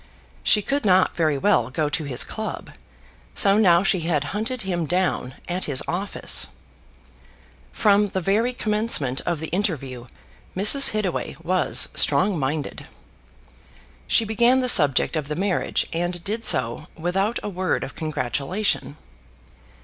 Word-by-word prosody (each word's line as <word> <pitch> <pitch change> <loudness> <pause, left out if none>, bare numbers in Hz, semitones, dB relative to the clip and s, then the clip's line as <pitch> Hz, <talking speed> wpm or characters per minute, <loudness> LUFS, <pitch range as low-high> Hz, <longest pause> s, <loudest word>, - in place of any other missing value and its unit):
She 210 - +3
could 280 +4 -1
not 190 -2 +3
very 155 -4 +1
well 135 - +2
go 150 +3 -1
to 150 +1 -3
his 130 -3 +2
club; 220 0 -6 0.6
so 200 0 +4
now 180 -4 +4
she 195 -1 +2
had 160 -3 -1
hunted 225 +3 -3
him 175 -4 -2
down 175 -6 -1
at 180 +1 -3
his 140 -3 0
office. 190 +4 +1 1.2
From 205 -1 +3
the 190 - -3
very 210 +7 +1
commencement 210 - -1
of 170 -3 -1
the 160 - -5
interview 140 - -3 0.5
Mrs. 210 +9 +4
Hittaway 205 -9 -3
was 185 +2 +1
strong 190 -3 +2
minded. 145 +2 -4 1.2
She 225 - +3
began 235 +4 +3
the 255 - -1
subject 145 - +5
of 155 -3 -3
the 150 - -3
marriage, 190 +1 -1
and 175 +1 -3
did 220 +3 -3
so 125 - +1
without 195 +7 -1
a - - -3
word 185 -1 -2
of - - -7
congratulation. 155 - -2
180 Hz, 140 wpm, -23 LUFS, 155-210 Hz, 1.2 s, subject